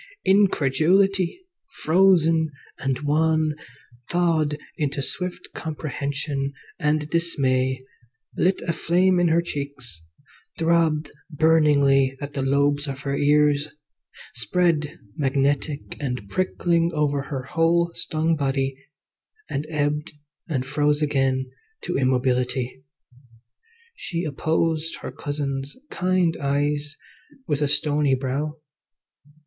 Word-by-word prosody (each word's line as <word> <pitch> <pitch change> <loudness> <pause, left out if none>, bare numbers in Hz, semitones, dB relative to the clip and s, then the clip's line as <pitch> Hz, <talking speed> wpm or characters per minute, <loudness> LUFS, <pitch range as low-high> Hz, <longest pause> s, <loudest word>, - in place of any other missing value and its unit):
Incredulity, 190 - +3 0.4
frozen 165 -2 +4 0.3
and 135 0 -1
wan, 155 +1 +2 0.6
thawed 160 -4 +1 0.2
into 140 -2 -2
swift 180 +6 -3
comprehension 140 -2 -3 0.3
and 150 0 +1
dismay, 130 -6 0 0.5
lit 185 +2 +1
a 170 - -1
flame 180 +3 +2
in 175 - +3
her 170 +1 +3
cheeks, 140 - -6 0.6
throbbed 165 -2 +2 0.2
burningly 145 -4 +3
at 145 0 -6
the 140 - -2
lobes 140 +2 +1
of 135 0 -5
her 140 -1 -2
ears, 145 0 +3 0.7
spread 150 - 0 0.2
magnetic 140 +1 0
and 125 -7 -4
prickling 170 -2 +1
over 145 -2 +1
her 135 -1 -5
whole 170 +4 +2
stung 160 +1 0
body, 135 -2 -1 0.8
and 145 +3 -2
ebbed 150 -1 -1 0.4
and 130 -5 -1
froze 145 +2 +1
again 135 -3 +1 0.4
to - - -3
immobility. 130 0 0 1.1
She 170 -1 -4
opposed 160 +1 -1
her - - -5
cousin's 140 -2 -4
kind 180 -2 +1
eyes 145 +1 0 0.5
with 145 -1 -1
a 145 - +3
stony 145 -1 +3
brow. 140 +4 -3
150 Hz, 100 wpm, -24 LUFS, 140-165 Hz, 1.1 s, frozen